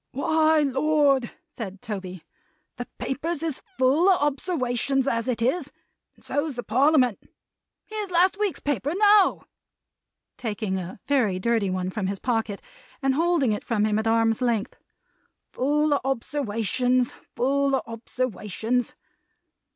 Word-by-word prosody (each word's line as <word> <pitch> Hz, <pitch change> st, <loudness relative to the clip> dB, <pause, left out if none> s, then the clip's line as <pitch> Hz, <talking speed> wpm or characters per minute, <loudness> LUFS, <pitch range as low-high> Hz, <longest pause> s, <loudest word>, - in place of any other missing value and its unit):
"Why! 315 Hz, +3 st, +3 dB
Lord!" 275 Hz, -2 st, +2 dB, 0.2 s
said 200 Hz, -4 st, -8 dB
Toby. 185 Hz, -5 st, -6 dB, 0.5 s
"The 245 Hz, -, -5 dB
Papers 315 Hz, +4 st, -3 dB
is 315 Hz, -5 st, -2 dB, 0.2 s
full 280 Hz, +9 st, +4 dB
of 375 Hz, -, +4 dB
obserwations 270 Hz, -3 st, 0 dB
as 230 Hz, -2 st, 0 dB
it 235 Hz, -2 st, -1 dB
is; 270 Hz, +9 st, 0 dB, 0.4 s
and -, -, -24 dB
so's 290 Hz, -1 st, -2 dB
the 245 Hz, -, -4 dB
Parliament. 255 Hz, -1 st, +3 dB, 0.7 s
Here's 425 Hz, -2 st, -5 dB
last 360 Hz, +2 st, +3 dB
week's 415 Hz, -4 st, 0 dB
paper, 285 Hz, -, -1 dB
now;" 410 Hz, -1 st, +4 dB, 0.9 s
taking 210 Hz, -5 st, -3 dB
a 185 Hz, +2 st, -8 dB
very 245 Hz, -10 st, +1 dB
dirty 220 Hz, 0 st, +1 dB
one 185 Hz, 0 st, -2 dB
from 195 Hz, -1 st, -2 dB
his 195 Hz, +1 st, -2 dB
pocket, 225 Hz, -3 st, -2 dB, 0.4 s
and 270 Hz, 0 st, +3 dB
holding 325 Hz, -4 st, +2 dB
it 210 Hz, -, -2 dB
from 215 Hz, -3 st, 0 dB
him 215 Hz, 0 st, +1 dB
at 220 Hz, -, -2 dB
arm's 225 Hz, +1 st, +2 dB
length; 235 Hz, -4 st, 0 dB, 0.8 s
"full 295 Hz, +3 st, +1 dB
of 285 Hz, -, +1 dB
obserwations! 250 Hz, -1 st, 0 dB, 0.2 s
Full 275 Hz, +3 st, +2 dB
of -, -, -1 dB
obserwations! 230 Hz, 0 st, -3 dB
255 Hz, 135 wpm, -25 LUFS, 225-295 Hz, 0.9 s, full